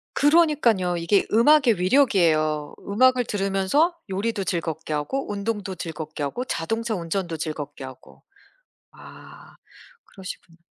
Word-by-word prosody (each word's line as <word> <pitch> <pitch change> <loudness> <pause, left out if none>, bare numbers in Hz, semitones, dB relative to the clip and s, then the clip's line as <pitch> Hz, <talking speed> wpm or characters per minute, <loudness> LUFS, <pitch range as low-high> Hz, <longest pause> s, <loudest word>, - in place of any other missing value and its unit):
그러니까요. 285 - +3
이게 170 +4 +2
음악의 235 - +4
위력이에요. 170 - +2
음악을 250 +4 +3
들으면서 200 - +1
요리도 200 +1 -2
즐겁게 160 -3 -3
하고 205 - -3
운동도 205 -1 -3
즐겁게 155 -3 -6
하고 240 - -3
자동차 225 +6 -2
운전도 170 -1 -3
즐겁게 150 -3 -6
하고. 130 -1 -13 0.7
아 - - -15 0.5
그러시구나. 180 -3 -11
195 Hz, 310 characters per minute, -24 LUFS, 165-230 Hz, 0.7 s, 음악의